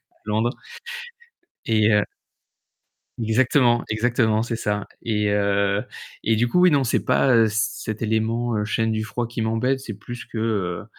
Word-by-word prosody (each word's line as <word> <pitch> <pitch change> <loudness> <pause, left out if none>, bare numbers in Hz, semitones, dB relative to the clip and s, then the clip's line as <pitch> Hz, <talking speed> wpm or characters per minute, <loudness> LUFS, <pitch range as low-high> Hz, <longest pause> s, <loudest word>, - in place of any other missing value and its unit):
à - - -35
Londres 110 +3 +1 1.2
et 110 -1 +3
heu 105 -1 +4 1.2
Exactement, 120 +1 +3
exactement, 110 -1 +1
c'est 120 - -3
ça 105 -2 -2 0.2
et 105 -2 0
heu, 100 0 +1 0.4
et 115 - +2
du 120 +3 +2
coup, 180 +9 +2
oui, 180 0 +6
non, 140 -3 +3
c'est 120 - 0
pas, 130 -3 +3
heu, 115 -1 +5
cet 110 -1 -2
élément, 115 +1 0
heu, 105 - 0
chaîne 110 +1 0
du 110 0 -1
froid 120 +2 -3
qui 115 0 -4
m'embête, 125 +4 0
c'est 115 -5 -7
plus 120 +4 -8
que, 115 - -7
heu, 100 -6 -1
110 Hz, 165 wpm, -23 LUFS, 105-120 Hz, 1.2 s, oui